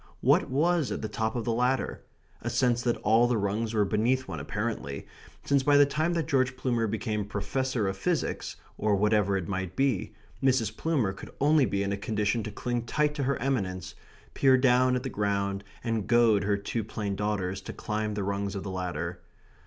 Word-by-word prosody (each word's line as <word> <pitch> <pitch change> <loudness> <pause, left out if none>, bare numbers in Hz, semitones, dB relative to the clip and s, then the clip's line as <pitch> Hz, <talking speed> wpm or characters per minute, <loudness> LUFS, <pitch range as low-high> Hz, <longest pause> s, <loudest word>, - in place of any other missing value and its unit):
What - - +3
was 160 +2 +2
at - - -3
the - - -1
top 110 +2 -2
of 120 -2 -2
the 115 - +1
ladder? 125 +2 0 0.4
A - - -2
sense 120 -2 +2
that 120 -1 0
all 115 +3 +5
the 120 -1 +1
rungs 105 +2 -1
were 105 -1 +3
beneath 120 +6 +1
one - - -5
apparently; 105 -10 -4 0.4
since 140 -1 +3
by 145 +2 +4
the 145 - +7
time 155 +4 0
that 165 -2 0
George 130 -3 +1
Plumer 120 -4 0
became 110 0 -2
Professor 110 +3 -1
of 95 - -1
Physics, 95 - -2 0.2
or 105 -1 +2
whatever 105 -1 +2
it 90 - -4
might 95 -2 -3
be, 135 -8 0 0.3
Mrs. 120 -5 +2
Plumer 135 -12 0
could 95 - -10
only 145 -2 +4
be 100 0 0
in 100 - -2
a - - -2
condition 105 +2 0
to 105 - -5
cling 120 +3 -2
tight 150 +4 +1
to 145 -2 -2
her 140 0 +1
eminence, 100 -9 -2 0.4
peer 130 -1 +5
down 125 0 +4
at 125 - -2
the - - -2
ground, 100 -2 -1 0.2
and 115 -4 -1
goad 115 -4 +4
her 100 0 +2
two 105 +3 -3
plain 100 -1 -3
daughters 95 -2 -2
to - - -7
climb 105 0 -3
the 100 - -2
rungs 100 0 -2
of 100 - -4
the 100 - -5
ladder. 90 -2 -4
110 Hz, 200 wpm, -28 LUFS, 100-130 Hz, 0.4 s, the